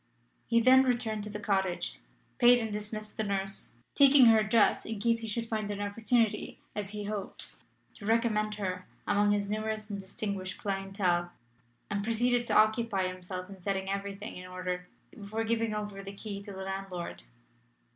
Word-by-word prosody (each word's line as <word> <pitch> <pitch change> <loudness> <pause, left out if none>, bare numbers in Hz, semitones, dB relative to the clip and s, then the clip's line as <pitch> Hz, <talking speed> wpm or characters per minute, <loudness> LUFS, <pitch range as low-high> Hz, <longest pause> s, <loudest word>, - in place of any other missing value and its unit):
He 230 -1 +4
then 255 +3 +7
returned 240 -5 0
to - - -6
the 210 0 -5
cottage, 190 - -1 0.4
paid 245 +1 +8
and 225 -3 -2
dismissed 215 0 -6
the 220 - 0
nurse, 195 - -3 0.2
taking 275 -2 +7
her 225 -1 +7
address 215 0 +3
in 220 0 -4
case 230 +2 +2
he 225 - -4
should 230 +2 -2
find 215 -2 -2
an 205 -1 -3
opportunity, 220 +2 +1 0.2
as 205 -2 -2
he 210 0 -4
hoped, 205 -1 -4 0.4
to 205 - -8
recommend 215 -2 +2
her 185 -3 -3 0.2
among 205 0 +3
his 205 -1 +1
numerous 215 0 -2
and 200 - -3
distinguished 195 -1 -4
clientele, 195 -3 0 0.6
and 200 -1 -1
proceeded 240 +2 +2
to - - +3
occupy 215 -3 +3
himself 185 0 -6
in 195 -1 -11
setting 195 0 -1
everything 200 +2 -4
in 180 0 -8
order 180 0 -4 0.2
before 215 +1 -4
giving 225 -1 0
over 205 -2 -4
the 195 0 -8
key 200 0 -6
to 200 0 -9
the 190 0 -6
landlord. 195 -2 -5
205 Hz, 170 wpm, -30 LUFS, 195-225 Hz, 0.6 s, paid